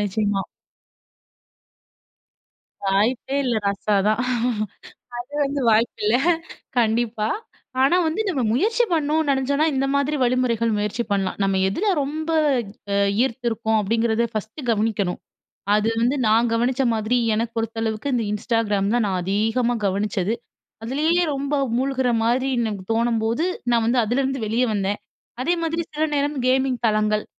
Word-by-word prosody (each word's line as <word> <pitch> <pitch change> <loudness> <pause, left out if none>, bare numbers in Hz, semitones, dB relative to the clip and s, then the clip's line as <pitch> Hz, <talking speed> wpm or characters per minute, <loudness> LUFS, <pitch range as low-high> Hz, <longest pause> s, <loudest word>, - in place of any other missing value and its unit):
நிச்சியமா. 205 0 0 2.5
"வாய்ப்பே 225 +7 +1
இல்ல 240 -3 +1
ரஸா 200 +1 0
தான்" 215 +2 +1 1.1
அது 285 - -21
வந்து 280 0 -2
வாய்ப்பு 225 +2 +2
இல்ல. 215 +3 +4 0.6
கண்டிப்பா, 225 -1 +1 0.5
ஆனா, 280 +6 +4
வந்து 320 +7 -1
நம்ம 280 -9 0
முயற்சி 450 - +2
பண்ணனோம் 310 0 +1
நெனைச்சோம்னா 280 +3 +1
இந்த 270 +1 +1
மாதிரி 280 +2 +1
வழிமுறைகள் 240 -2 +1
முயற்சி 210 +3 -1
பண்ணலாம். 195 -2 0
நம்ம 195 -1 +1
எதில 345 - -2 0.2
ரொம்ப 310 +3 -4 0.6
அ - - +1 0.3
ஈர்த்து 255 -1 -2
இருக்கோம் 220 -1 0
அப்டிங்கிறத 225 +2 +1
ஃபர்ஸ்ட்டு 220 +6 -5
கவனிக்கணும். 210 -4 0 0.6
அது 210 +1 +2
வந்து 250 +4 +2
நான் 230 +2 +3
கவனிச்ச 245 +3 +1
மாதிரி 220 +3 0 0.2
எனக்கு 230 +2 -1
பொறுத்த 225 0 -2
அளவுக்கு 220 +5 -2
இந்த 235 -2 +1
Instagram 210 -2 0
தான் 240 -1 +2
நான் 190 - -1
அது 190 +2 -2
அதிகமா 240 +2 +1
கவனிச்சது. 200 +1 0 0.5
அதுலேயே 310 +9 +1
ரொம்ப 280 +2 -1 0.2
மூழ்குற 260 -1 0
மாதிரி 250 +3 +1
எனக்கு 215 -5 -2
தோணும்போது 230 +3 +1 0.3
நான் 235 -1 +3
வந்து 245 +2 +2
அதுலேருந்து 265 +4 0
வெளியே 230 +4 +1
வந்தேன். 200 0 -1 0.4
அதே 345 +7 +2
மாதிரி 330 +1 -1
சில 310 +1 +1
நேரம் 290 +1 0
கேமிங் 260 0 +2
தலங்கள். 215 -1 +1
235 Hz, 135 wpm, -22 LUFS, 215-270 Hz, 2.5 s, இல்ல